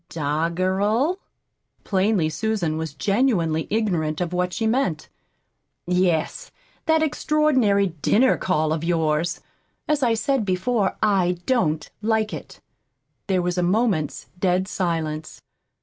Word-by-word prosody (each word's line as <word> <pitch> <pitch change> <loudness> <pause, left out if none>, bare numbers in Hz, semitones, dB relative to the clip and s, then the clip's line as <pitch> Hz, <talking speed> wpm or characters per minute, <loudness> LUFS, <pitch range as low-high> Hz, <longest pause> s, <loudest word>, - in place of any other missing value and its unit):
"Doggerel?" 185 - 0 0.6
Plainly 195 -3 +1
Susan 170 0 -1
was 160 -3 -5
genuinely 190 - +1
ignorant 175 -8 0
of 175 -1 -2
what 180 0 0
she 225 - -2
meant. 220 - 0 0.8
"Yes, 180 -3 0 0.4
that 320 0 +3
extraordinary 270 -10 +2
dinner 255 - +4
call 155 -4 0
of 160 0 -3
yours. 165 -1 0 0.5
As 300 -1 +1
I 235 -3 +3
said 270 +2 0
before, 200 +2 0
I 185 -4 +2
don't 160 -12 +1
like 220 0 0
it." - - -9 0.7
There 185 -3 +1
was 180 0 -1
a - - +2
moment's 185 -4 0
dead 185 0 +1
silence. 160 -5 -3
185 Hz, 120 wpm, -23 LUFS, 165-220 Hz, 0.8 s, dinner